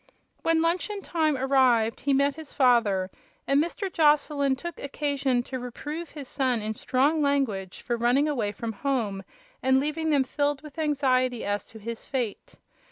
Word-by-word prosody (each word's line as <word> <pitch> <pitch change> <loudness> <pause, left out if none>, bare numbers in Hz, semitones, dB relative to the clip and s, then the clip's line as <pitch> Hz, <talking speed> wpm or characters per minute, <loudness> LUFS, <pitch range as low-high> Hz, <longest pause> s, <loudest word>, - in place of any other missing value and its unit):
When 330 0 +2
luncheon 370 +4 -1
time 310 -4 +1
arrived 255 -4 +3
he 280 - 0
met 280 +1 +3
his 315 0 -10
father, 225 -8 +3 0.3
and 280 +2 +3
Mr. 375 +3 -4
Joslyn 295 -3 +3
took 345 +6 -7
occasion 280 -3 -1
to 260 +1 -5
reprove 295 +7 -6
his 290 -3 -9
son 255 -4 0
in 215 0 -3
strong 280 +7 +1
language 255 -10 0
for 240 -2 -1
running 245 +5 +3
away 235 -9 -1
from 225 +1 -5
home 215 -6 -2 0.4
and 265 0 +4
leaving 305 +3 -1
them 285 -3 +4
filled 285 +2 -1
with 300 +1 -10
anxiety 255 -5 +1
as 205 0 -1
to 225 - -14
his 230 +2 -7
fate. 245 -6 -4
270 Hz, 165 wpm, -26 LUFS, 240-295 Hz, 0.4 s, and